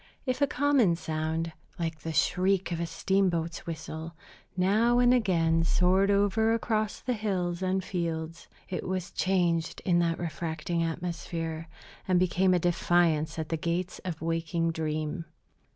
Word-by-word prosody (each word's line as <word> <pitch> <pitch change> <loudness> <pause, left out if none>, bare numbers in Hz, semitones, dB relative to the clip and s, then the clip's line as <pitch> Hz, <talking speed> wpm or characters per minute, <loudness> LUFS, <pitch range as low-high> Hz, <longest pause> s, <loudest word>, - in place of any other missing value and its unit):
If 255 0 -1
a 285 - +5
common 260 -9 +3
sound, 160 0 -2 0.3
like 165 -3 -3
the 165 - -5
shriek 185 +4 +2
of 170 - -2
a 170 - -1
steamboat's 170 -3 0
whistle, 160 0 -6 0.4
now 215 +6 +3
and 245 0 +5
again 165 -8 +2
soared 185 +4 +3
over 205 +3 +3
across 215 -2 -1
the 250 - -1
hills 185 -5 -2
and 190 0 0
fields, 165 -2 -4 0.2
it 185 - -4
was 185 -1 -3
changed 175 -3 0
in 175 -2 +3
that 170 -1 +1
refracting 170 0 -3
atmosphere, 165 -1 -3 0.4
and 185 -1 +3
became 185 +1 +3
a - - +4
defiance 165 -2 +2
at 160 -1 -3
the 165 - 0
gates 170 +3 -2
of 165 -4 -5
waking 165 0 0
dream. 155 +1 -3
175 Hz, 145 wpm, -29 LUFS, 165-190 Hz, 0.4 s, a